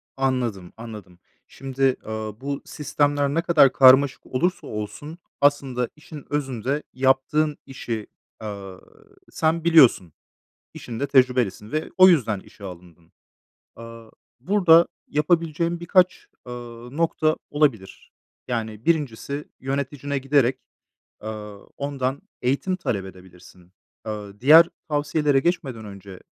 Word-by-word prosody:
Anladım, 125 -9 -2
anladım. 105 -6 -10 0.3
Şimdi, 135 -1 -1
ııı, 110 0 -6
bu 140 0 -4
sistemler 145 -1 0
ne 165 - +1
kadar 155 -6 +5
karmaşık 135 +1 +5
olursa 175 +8 -1
olsun 110 +10 -7 0.2
aslında 135 -4 +1
işin 150 -1 -12
özünde 135 0 -2
yaptığın 135 +3 +1
işi, 115 -5 -6 0.4
ııı, 100 -3 -8 0.5
sen 160 +1 0
biliyorsun. 135 - +5 0.6
İşinde 120 +3 -5
tecrübelisin 125 -6 +1
ve 155 +1 -2
o 185 0 +8
yüzden 115 - +2
işe 100 - -16
alındın. 85 -2 -12 0.6
Aaa, 115 -1 -11 0.3
burada 170 +1 +5 0.2
yapabileceğin 165 +2 0
birkaç, 180 +1 +2 0.2
ııı, 120 +1 -9
nokta 155 -1 +1
olabilir. 135 -11 -1 0.4
Yani 110 -2 -4
1'incisi 145 -2 -1
yöneticine 140 +1 -3
giderek, 135 -2 +2 0.6
ııı, 105 -2 -8
ondan 140 +1 -3 0.2
eğitim 140 +9 0
talep 100 - -3
edebilirsin. 90 -1 -16 0.3
Aaa, 105 -2 -7
diğer 160 +6 +8 0.2
tavsiyelere 145 -1 +1
geçmeden 135 -9 -2
önce 100 -2 -11
130 Hz, 105 wpm, -23 LUFS, 110-150 Hz, 0.6 s, o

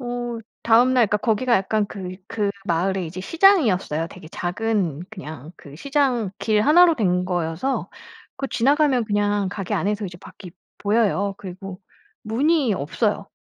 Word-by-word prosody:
어 240 -1 -4 0.2
다음날 240 +1 +4
그러니까 210 - +2
거기가 235 +3 +1
약간 205 +2 0
그 185 -3 -7
그 205 -2 -1 0.2
마을에 185 +3 0
이제 180 +3 -7
시장이었어요. 215 - +3
되게 165 -3 -12
작은 180 -3 -2
그냥 155 -3 -9
그 140 0 -13
시장 260 - 0
길 215 -1 +1
1 340 +7 +7
로 335 - +3
된 180 -6 +1
거여서 175 +7 -2 0.5
그 275 - -3
지나가면 275 0 +2
그냥 205 -2 0
가게 195 -2 -4
안에서 210 +1 -1
이제 175 -1 -9
밖이 180 0 -12 0.3
보여요. 205 -2 +1
그리고 190 0 -8 0.4
문이 265 +1 +1
없어요. 200 - -2
205 Hz, 305 characters per minute, -22 LUFS, 185-240 Hz, 0.5 s, 1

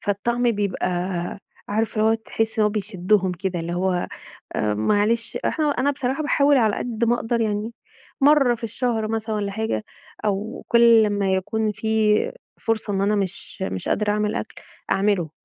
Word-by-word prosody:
فالطعم 235 +5 -1
بيبقى 200 -4 -1 0.8
عارف 220 +2 -1
اللي 215 - +4
هو 225 - +4
تحس 225 0 -3
إنه 210 -1 +4
بيشدّهم 195 -2 0
كده 180 -1 -3
اللي 170 +1 -4
هو 180 0 0 0.5
آآ، 105 -1 +1
معلش 210 - +1
إحنا 310 -1 +1
أنا 280 0 +1
بصراحة 270 +1 -2
باحاول 285 -1 +3
على 220 -4 +3
قد 235 -1 -2
ما 235 - +3
أقدر 235 0 -1
يعني 215 +1 -1 0.5
مرّة 275 -3 +5
في 230 - -8
الشهر 225 -1 -1
مثلًا 220 0 -2
والَّا 200 -1 -2
حاجة، 220 +1 -2 0.4
أو 210 +2 -2
كُلّ 235 -1 +6
لمّا 205 -2 +1
يكون 210 +3 0
في 220 0 +2 0.4
فرصة 225 -2 -1
إن 195 - 0
أنا 205 +2 +2
مش 195 -1 -4
مش 95 - -3
قادرة 210 0 +1
أعمل 210 0 0
أكل - - -4 0.4
أعملُه. 195 -5 +1
215 Hz, 165 wpm, -23 LUFS, 200-230 Hz, 0.8 s, كُلّ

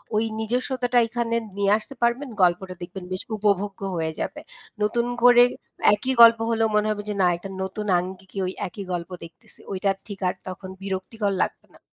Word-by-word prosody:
ওই 215 - +3 0.2
নিজস্বতাটা 245 +2 0
এখানে 230 0 -1 0.2
নিয়ে 200 0 +2
আসতে 250 +6 -10
পারবেন, 240 +4 +1
গল্পটা 180 +1 +2
দেখবেন 180 +2 -7
বেশ 185 - -3
উপভোগ্য 200 -1 0 0.2
হয়ে 160 -1 -1
যাবে। - - -4 0.4
নতুন 235 +3 +1 0.2
করে 245 0 +8 0.5
একই 255 +6 -1
গল্প 230 -1 +9
হলেও 225 -1 +2
মনে 210 0 +3
হবে 205 -1 -3
যে - - 0
না 180 - +5
একটা 195 +3 -9
নতুন 190 +3 -4
আঙ্গিকে 190 +2 -8
ওই 185 - -3
একই 195 +2 -8
গল্প 170 0 -4
দেখতেছি. 165 0 -15
ওইটা 195 +1 0 0.2
ঠিক 200 -3 -7
আর 180 - -1
তখন 185 +1 -7
বিরক্তিকর 200 +2 -2
লাগবে - - -6
না। - - -19
205 Hz, 175 wpm, -24 LUFS, 185-230 Hz, 0.5 s, গল্প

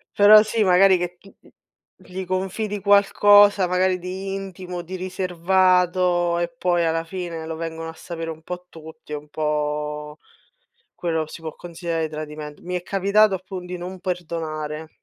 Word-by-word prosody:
Però 210 +1 +9
sì, 220 0 0
magari 185 0 +5
che 175 0 -4
t 200 - -19
m - - -21 0.5
gli 185 +1 -7
confidi 190 +3 -2
qualcosa, 205 -1 +5
magari 185 0 +1
di 190 +2 -5
intimo, 185 -2 -6
di 180 +2 -7
riservato 180 -1 +2
e 175 0 -1
poi 175 -1 +1
alla 165 0 0
fine 170 -2 -5
lo 160 - -4
vengono 165 0 -5
a - - -8
sapere 165 0 -7
un 160 0 -7
po' 180 +1 -7
tutti, 160 -1 -11
è - - -1
un 150 0 -9
po' 150 0 -2 0.8
quello 160 -2 -2
si 165 - -10
può 160 -1 -7
considerare 170 -2 -3
tradiment 150 -1 -7
Mi 180 +1 -4
è 180 - -3
capitato 200 +2 +3
appun 185 0 -7
di 180 0 -6
non 180 +1 -7
perdonare. 160 -3 -4
175 Hz, 160 wpm, -23 LUFS, 160-185 Hz, 0.8 s, Però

